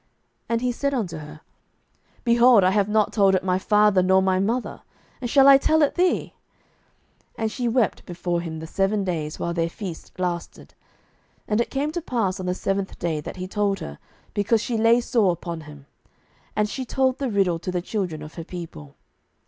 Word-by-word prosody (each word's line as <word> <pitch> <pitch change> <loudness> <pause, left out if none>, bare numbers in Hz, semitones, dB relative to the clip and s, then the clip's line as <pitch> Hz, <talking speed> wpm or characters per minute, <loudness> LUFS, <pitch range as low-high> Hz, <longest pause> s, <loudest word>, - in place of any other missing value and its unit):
And 230 0 0
he 250 0 +1
said 280 +3 -1
unto 185 -10 -3
her, 150 +1 -11 0.8
Behold, 235 -3 +5
I 185 - +4
have 205 0 +1
not 215 -1 +2
told 195 -3 +4
it 185 - 0
my 185 0 +1
father 210 -1 +4
nor 190 +1 +4
my 190 -1 +2
mother, 230 +6 -2 0.4
and 245 - -3
shall 275 +2 +6
I 275 -1 +9
tell 315 +2 +3
it 290 - +2
thee? 365 0 +1 1.0
07:014:017 - - -4
And 220 - 0
she 245 0 -2
wept 235 -3 0
before 175 -1 -2
him 165 -2 -6
the 160 - -7
seven 195 +4 0
days, 160 -5 -3
while 170 - -2
their 165 -1 0
feast 175 -3 -8
lasted: 175 -2 -4 0.7
and 215 +2 +1
it - - -2
came 285 +3 -1
to 345 +2 -3
pass 215 - -1
on 185 - -4
the 180 - 0
seventh 195 0 -2
day, 160 -3 -2
that - - -7
he 185 0 -5
told 200 0 0
her, 70 - -8 0.3
because 210 +2 +2
she 240 - -2
lay 230 +2 +4
sore 230 -6 +2
upon 170 -1 -6
him: 145 -2 -13 0.7
and 210 0 +2
she 260 +5 -4
told 260 +1 0
the 275 -2 -1
riddle 190 -5 +1
to 185 - -4
the 180 - -1
children 175 -5 -3
of 155 - -10
her 165 - -7
people. 160 - -9
195 Hz, 200 wpm, -24 LUFS, 175-235 Hz, 1.0 s, I